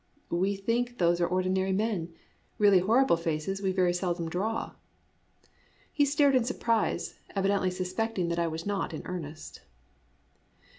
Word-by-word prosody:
" - - -39 0.2
We 200 +1 0
think 240 +5 -1
those 175 0 +2
are 175 - +3
ordinary 185 +1 0
men. 195 -5 -1 0.5
Really 200 -3 +6
horrible 225 +2 +3
faces 165 +4 -2
we 190 -1 +1
very 180 -2 +2
seldom 175 -2 -2
draw." 205 +7 -2 1.2
He 290 - +3
stared 285 0 +3
in 255 - +4
surprise, 230 -2 -1 0.2
evidently 195 -1 +1
suspecting 185 +1 -2
that 170 0 -1
I 170 - +1
was 160 +1 -5
not 200 -5 -2
in - - -7
earnest. 160 -4 -7
190 Hz, 145 wpm, -29 LUFS, 175-220 Hz, 1.2 s, Really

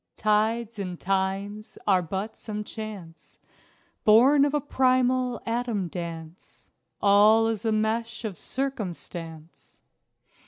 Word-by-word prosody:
Tides 220 +1 0
and 180 -3 -5
times 195 +2 -2
are 190 -3 +4
but 190 +6 -4
some 210 -1 -5
chance 205 -7 -9 0.7
Born 265 +7 +6
of 290 +1 0
a - - +2
primal 255 -2 +1
atom 230 -5 -2
dance. 165 -1 -9 0.3
All 210 +2 +6
is 225 -1 -2
a 225 - +2
mesh 220 +1 -1
of 205 -4 -4
Circumstance. 175 - -6
215 Hz, 110 wpm, -26 LUFS, 190-235 Hz, 0.7 s, Born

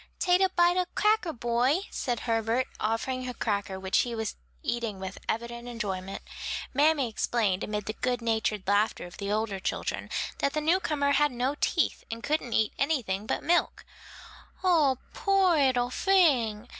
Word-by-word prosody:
"Tate 360 +1 +3
a 380 - +4
bite 350 0 +3
of 360 -1 -1
cacker, 425 -5 +2
boy," 245 +5 +1
said 240 -3 -2
Herbert, 230 +2 +1
offering 255 +4 -1
a 250 - -6
cracker 200 -3 -2
which 190 0 +1
he 240 -2 0
was 220 -1 -3 0.3
eating 235 -4 -2
with 190 0 -6
evident 235 +1 -3
enjoyment. 195 -5 -4 0.5
Mammy 290 -1 +3
explained, 215 -3 0
amid 210 -1 -3
the 215 - -3
good 245 +1 -1
natured 220 -3 0
laughter 205 -1 +1
of 175 - -11
the 200 0 -3
older 210 -2 -1
children, - - -3 0.3
that 280 - +1
the 305 - 0
newcomer 305 -3 +1
had 295 +1 +3
no 250 +3 -1
teeth - - +1
and 230 0 -6
couldn't 295 -6 -1
eat 220 -1 +2
anything 225 -9 0
but - - -1
milk. 345 +2 +1 0.8
"Oh, 310 -8 +4 0.2
poor 390 -3 +3
'ittle 255 -4 +2
fing!" 250 - +3
240 Hz, 160 wpm, -28 LUFS, 215-295 Hz, 0.8 s, a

